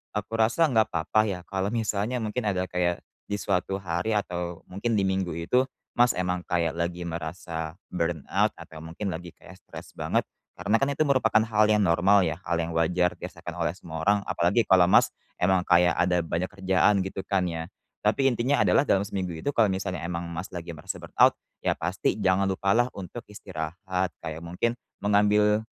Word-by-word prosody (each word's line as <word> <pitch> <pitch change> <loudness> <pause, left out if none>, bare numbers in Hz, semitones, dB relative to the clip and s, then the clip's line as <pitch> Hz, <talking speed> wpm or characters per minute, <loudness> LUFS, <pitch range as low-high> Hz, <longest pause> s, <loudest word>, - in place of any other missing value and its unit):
aku 105 +1 -3
rasa 120 +9 +4
nggak 110 -2 +4
apa-apa 80 +6 +1
ya, 90 -2 -3
kalau 95 0 -1
misalnya 110 +1 -1
mungkin 110 +2 -2
ada 95 -1 0
kayak 90 -1 0 0.3
di 105 - 0
suatu 95 0 0
hari 90 +5 -1
atau 90 -3 -4
mungkin 100 +5 -2
di - - +3
minggu 95 -2 -1
itu, 125 +10 +2 0.3
Mas 120 +1 +5
emang 90 -1 -1
kayak 85 -2 0
lagi 85 +1 -2
merasa 80 -1 -5 0.2
burnout 85 -4 0
atau 80 - -11
mungkin 95 +5 -4
lagi 90 +2 -7
kayak - - -15
stres - - -11
banget, - - 0 0.3
karena 100 +5 +1
kan 135 - +3
itu 140 +2 +1
merupakan 115 -6 +3
hal 110 -1 +3
yang 105 -1 +4
normal 95 +4 +4
ya, 80 +1 -2
hal 85 - +1
yang 85 0 -2
wajar 90 +2 +2
dirasakan - - -7
oleh 85 - 0
semua 80 -3 -7
orang, 100 +4 +4
apalagi 95 +7 +2
kalau 90 -2 +5
Mas - - +5 0.3
emang 95 +1 +3
kayak 90 0 +5
ada 90 -1 +2
banyak 85 +3 -1
kerjaan 95 +1 +2
gitu 95 0 -4
kan 95 -2 +1
ya. 80 -1 -4 0.4
Tapi 105 +6 +2
intinya 125 +4 +1
adalah 145 - +3
dalam 95 - +3
seminggu 95 -4 -4
itu 80 - -2
kalau 115 -6 +3
misalnya 95 -1 -2
emang 85 0 -4
Mas 90 +4 -5
lagi 85 0 -5
merasa 85 +3 -6
burnout, - - +4 0.2
ya - - 0
pasti 90 +2 -1
jangan 95 +1 +3
lupalah 100 +5 +2
untuk 100 +5 -8
istirahat 90 -1 -4
kayak 80 0 -5
mungkin 115 +8 -1 0.3
mengambil 105 +1 +3
95 Hz, 180 wpm, -26 LUFS, 85-105 Hz, 0.4 s, Mas